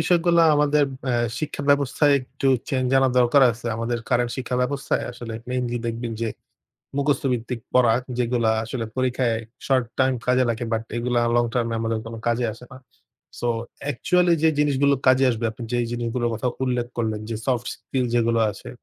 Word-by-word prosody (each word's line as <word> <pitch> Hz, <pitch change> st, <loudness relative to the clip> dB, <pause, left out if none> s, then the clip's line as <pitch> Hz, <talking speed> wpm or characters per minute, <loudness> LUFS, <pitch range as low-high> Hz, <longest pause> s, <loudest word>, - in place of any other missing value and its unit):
বিষয়গুলো 170 Hz, -1 st, +3 dB
আমাদের 150 Hz, 0 st, +3 dB, 0.2 s
ব্যা 130 Hz, -2 st, 0 dB, 0.2 s
শিক্ষা 150 Hz, -2 st, -4 dB
ব্যবস্থায় 140 Hz, +1 st, +3 dB
একটু 135 Hz, +2 st, -3 dB, 0.2 s
চেঞ্জ 130 Hz, -2 st, 0 dB
আনার 130 Hz, -1 st, +3 dB
দরকার 125 Hz, +3 st, +5 dB
আছে। 115 Hz, +1 st, -7 dB
আমাদের 115 Hz, +1 st, -2 dB
current 120 Hz, -1 st, +1 dB
শিক্ষা 130 Hz, -1 st, -2 dB
ব্যবস্থায় 135 Hz, +2 st, -1 dB
আসলে 120 Hz, -2 st, -7 dB
মেইনলি 125 Hz, -1 st, -1 dB
দেখবেন 115 Hz, 0 st, -3 dB
যে 115 Hz, -, 0 dB, 0.7 s
মুখস্থ 140 Hz, -1 st, +1 dB
ভিত্তিক 120 Hz, 0 st, -3 dB
পড়া 120 Hz, -3 st, +5 dB, 0.2 s
যেগুলা 120 Hz, -2 st, +1 dB
আসলে 115 Hz, +1 st, -4 dB
পরীক্ষায় 125 Hz, -2 st, +1 dB, 0.3 s
short 130 Hz, -2 st, +3 dB
term 130 Hz, 0 st, +3 dB
কাজে 125 Hz, +1 st, +3 dB
লাগে 115 Hz, +1 st, -1 dB
বাট 110 Hz, 0 st, 0 dB
এগুলো 120 Hz, +1 st, -1 dB, 0.2 s
long 120 Hz, 0 st, +2 dB
term 120 Hz, -2 st, +1 dB
এ -, -, -1 dB
আমাদের 115 Hz, 0 st, -1 dB
কোনো 115 Hz, 0 st, -7 dB
কাজে 120 Hz, +1 st, +1 dB
আসেনা। 125 Hz, +4 st, -13 dB, 0.6 s
So 120 Hz, -, 0 dB, 0.4 s
actually 180 Hz, +6 st, +2 dB
যে 160 Hz, -, +5 dB
জিনিসগুলো 140 Hz, -1 st, +3 dB
কাজে 130 Hz, +1 st, +5 dB
আসবে 115 Hz, -1 st, -3 dB
আপনি 115 Hz, +2 st, -8 dB
যেই 120 Hz, -1 st, +1 dB
জিনিসগুলোর 120 Hz, 0 st, -1 dB
কথা 115 Hz, +3 st, -1 dB, 0.2 s
উল্লেখ 125 Hz, -2 st, -1 dB
করলেন 110 Hz, -3 st, -1 dB
যে 115 Hz, -, -2 dB
soft 120 Hz, -2 st, 0 dB
skill 130 Hz, -2 st, -3 dB
যেগুলো 115 Hz, -1 st, +2 dB
আছে 100 Hz, -, -10 dB
125 Hz, 170 wpm, -23 LUFS, 115-135 Hz, 0.7 s, দরকার